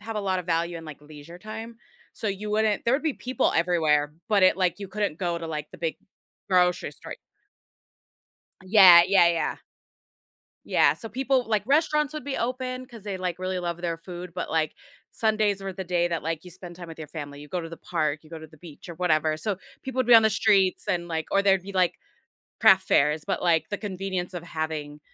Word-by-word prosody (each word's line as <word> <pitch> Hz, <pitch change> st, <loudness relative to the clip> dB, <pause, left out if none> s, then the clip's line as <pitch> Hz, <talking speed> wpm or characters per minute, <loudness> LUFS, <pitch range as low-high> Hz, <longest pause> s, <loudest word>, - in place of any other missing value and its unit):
have 220 Hz, +1 st, -6 dB
a 210 Hz, -, 0 dB
lot 190 Hz, -2 st, -1 dB
of 175 Hz, -, -12 dB
value 170 Hz, 0 st, 0 dB
in 165 Hz, -, -11 dB
like 155 Hz, -2 st, -10 dB
leisure 150 Hz, +3 st, -12 dB
time, 220 Hz, +3 st, -8 dB, 0.4 s
so -, -, -5 dB
you 205 Hz, +2 st, -4 dB
wouldn't 215 Hz, 0 st, +1 dB
there 235 Hz, -, +3 dB
would 280 Hz, -, 0 dB
be 315 Hz, -2 st, 0 dB
people 255 Hz, +1 st, -1 dB
everywhere, 155 Hz, -4 st, +2 dB, 0.2 s
but 205 Hz, -3 st, +3 dB
it 185 Hz, -, +5 dB
like, 180 Hz, -1 st, 0 dB
you 200 Hz, -, -6 dB
couldn't 200 Hz, -5 st, -2 dB
go 175 Hz, -2 st, -1 dB
to 165 Hz, -, -6 dB
like 150 Hz, -2 st, -5 dB
the -, -, -11 dB
big 165 Hz, -2 st, -2 dB, 0.5 s
grocery 180 Hz, -1 st, +2 dB
store -, -, -9 dB, 1.5 s
Yeah, 185 Hz, -3 st, +9 dB
yeah, 190 Hz, -3 st, +5 dB
yeah. 170 Hz, -1 st, 0 dB, 1.1 s
Yeah, -, -, +4 dB
so 225 Hz, -, -9 dB
people 260 Hz, +1 st, 0 dB
like 210 Hz, -3 st, +1 dB
restaurants 300 Hz, +2 st, +2 dB
would 305 Hz, -4 st, -5 dB
be 280 Hz, -1 st, -3 dB
open 255 Hz, +1 st, -3 dB
'cause 235 Hz, -5 st, -13 dB
they 200 Hz, -2 st, -4 dB
like 180 Hz, -1 st, -3 dB
really 185 Hz, 0 st, -2 dB
love 175 Hz, -1 st, -4 dB
their 170 Hz, -1 st, -2 dB
food, 175 Hz, +1 st, -9 dB
but 180 Hz, -, -4 dB
like, 160 Hz, -1 st, 0 dB, 0.4 s
Sundays 215 Hz, -3 st, +1 dB
were 195 Hz, -1 st, -5 dB
the 190 Hz, -, -5 dB
day 175 Hz, -1 st, +1 dB
that 170 Hz, -2 st, -3 dB
like 165 Hz, +1 st, -3 dB
you 180 Hz, -, -9 dB
spend 175 Hz, 0 st, -10 dB
time 175 Hz, -1 st, -9 dB
with 165 Hz, -1 st, -10 dB
your 155 Hz, -, -7 dB
family, 145 Hz, -2 st, -8 dB
you 150 Hz, -, -11 dB
go 180 Hz, +4 st, -3 dB
to 165 Hz, -, -7 dB
the 165 Hz, -, -9 dB
park, 155 Hz, -4 st, -2 dB
you 155 Hz, -, -18 dB
go 165 Hz, -, -7 dB
to 160 Hz, -, -11 dB
the 155 Hz, -, -19 dB
beach, 160 Hz, 0 st, -13 dB
or 170 Hz, -, -7 dB
whatever, 155 Hz, -3 st, +1 dB
so 195 Hz, +4 st, -2 dB, 0.2 s
people 265 Hz, -1 st, -4 dB
would 255 Hz, -, +2 dB
be 245 Hz, -, +7 dB
on 225 Hz, -, +8 dB
the 220 Hz, -, +4 dB
streets, 195 Hz, -3 st, +2 dB
and 175 Hz, -4 st, -1 dB
like, 160 Hz, -2 st, -3 dB
or 200 Hz, -, +3 dB
there'd 195 Hz, -2 st, +3 dB
be 200 Hz, -, -8 dB
like 185 Hz, -2 st, +2 dB, 0.6 s
craft 190 Hz, -4 st, +5 dB
fairs, 150 Hz, +2 st, +3 dB
but 195 Hz, -, -2 dB
like 165 Hz, -3 st, +2 dB
the 205 Hz, -, -3 dB
convenience 190 Hz, -3 st, -4 dB
of 175 Hz, -2 st, -6 dB
having 155 Hz, -3 st, -5 dB
180 Hz, 225 wpm, -26 LUFS, 165-210 Hz, 1.5 s, Yeah